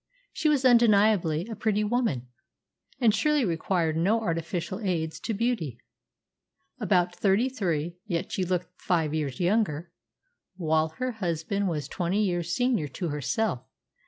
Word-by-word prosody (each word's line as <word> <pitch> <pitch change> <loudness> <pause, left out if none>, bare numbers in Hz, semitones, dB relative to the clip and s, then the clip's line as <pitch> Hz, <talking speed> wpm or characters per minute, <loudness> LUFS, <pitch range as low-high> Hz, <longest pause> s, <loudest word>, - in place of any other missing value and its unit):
She 315 -1 +1
was 280 -3 +2
undeniably 210 -9 +4
a 225 - -5
pretty 210 -1 0
woman, 210 - 0 0.7
and 230 -5 +4
surely 290 +4 +2
required 165 -2 0
no 195 +8 +2
artificial 170 -1 -3
aids 170 -7 -2
to - - -4
beauty. 205 - -1 1.0
About 180 -1 +2
thirty 200 +7 +2
three, 170 - -2
yet 170 -4 -2
she 190 - -1
looked 180 -1 -3
five 160 -4 +1
years 145 -5 -2
younger; 175 -4 0 0.6
while 160 -3 +1
her 255 0 -1
husband 195 -1 -2
was 150 -5 -3
twenty 185 +6 0
years 175 -3 -1
senior 245 - +1
to 175 +4 -4
herself. 150 - -1
180 Hz, 135 wpm, -27 LUFS, 165-220 Hz, 1.0 s, undeniably